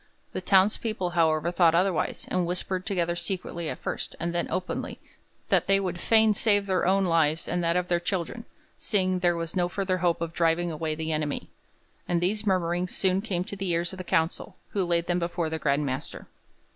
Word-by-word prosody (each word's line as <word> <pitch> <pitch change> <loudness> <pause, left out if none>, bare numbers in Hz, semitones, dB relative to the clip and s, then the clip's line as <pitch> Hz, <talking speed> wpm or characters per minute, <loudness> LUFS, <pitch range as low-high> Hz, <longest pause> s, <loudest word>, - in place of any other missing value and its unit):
The - - -3
townspeople, 195 -1 +2
however, 165 -1 +2
thought 170 -2 +4
otherwise, 180 -1 0
and 180 -2 0
whispered 185 +2 -2
together 175 -4 0
secretly 170 -1 -3
at - - -4
first, - - -5
and 170 0 -2
then 170 - -1
openly, 185 - -3 0.5
that - - +3
they 195 0 +4
would 180 -3 -3
fain 220 -1 +5
save 205 -1 +3
their 185 -2 +1
own 195 +1 +3
lives 165 -2 +2
and 175 +1 -1
that 170 0 +1
of 180 0 0
their 175 -1 +1
children, 190 +6 -3 0.3
seeing 185 -3 +1
there 175 -1 +2
was 165 +1 -4
no 175 -1 +1
further 185 0 -1
hope 175 -1 +1
of 165 0 -4
driving 170 +1 +1
away 155 0 -2
the 160 0 -3
enemy. 150 -2 -2 0.6
And 175 - +1
these 210 +5 -1
murmurings 180 -1 0
soon 190 0 +2
came 185 -5 -2
to 200 - -7
the 195 -1 -3
ears 170 +1 0
of - - -8
the 185 - -5
council, 165 -1 -1
who 200 - 0
laid 170 -1 +1
them 175 0 0
before 170 -1 -2
the 160 - -2
Grand 145 0 +1
Master. 130 +1 -4
175 Hz, 200 wpm, -27 LUFS, 170-190 Hz, 0.6 s, fain